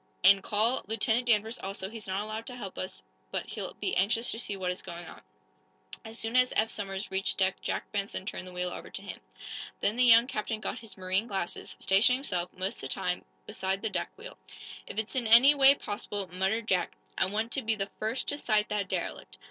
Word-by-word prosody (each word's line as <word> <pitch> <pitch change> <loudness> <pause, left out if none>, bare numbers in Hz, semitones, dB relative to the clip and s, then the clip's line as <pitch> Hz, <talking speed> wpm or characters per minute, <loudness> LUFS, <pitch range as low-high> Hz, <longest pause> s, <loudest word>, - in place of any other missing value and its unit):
And 195 +1 +7
call 220 +6 +1
Lieutenant 225 +3 +1
Danvers, 225 +1 +2
also. 195 0 -4
He's 220 0 -8
not 190 +2 -1
allowed 215 +1 -5
to 250 - -5
help 200 -6 -7
us, 185 - -5 0.3
but - - -2
he'll - - -6
be 380 - -2
anxious 230 +4 +2
to 225 - -2
see 205 -4 -3
what 185 -1 -1
is 180 - -4
going 175 -1 -8
on." - - -11 0.8
As 225 0 -6
soon 225 +1 -2
as 250 0 +5
Eph 220 +1 +2
Somers 195 0 -4
reached 190 0 +2
deck 190 -1 +1
Jack - - -3
Benson 200 -2 -3
turned 185 -2 -5
the - - -9
wheel 180 0 -2
over - - -7
to - - -3
him. - - -7 0.6
Then 210 +3 +1
the 250 - +5
young 235 -1 +8
captain 220 -3 -3
got - - -4
his 225 -3 -8
marine 190 +4 0
glasses, 195 -5 -3
stationing 220 +7 +5
himself, 180 -10 -2
most 185 +2 -3
of - - -5
the - - -1
time, - - -1 0.2
beside 190 +1 -2
the 220 - -1
deck 185 - -1
wheel. 460 +4 -10 0.5
"If - - -7
it's 220 +3 -2
in 245 -3 0
any 240 +6 +9
way 275 -1 +7
possible," 205 -3 -4
muttered 195 +5 0
Jack, 185 -4 +1 0.2
"I 190 - +2
want 215 +4 -1
to 275 - +1
be 225 -2 +1
the 195 -1 -3
first 220 +4 -1
to 290 - -2
sight 215 -5 +2
that 205 -2 -1
derelict. - - -3
210 Hz, 220 wpm, -30 LUFS, 190-230 Hz, 0.8 s, any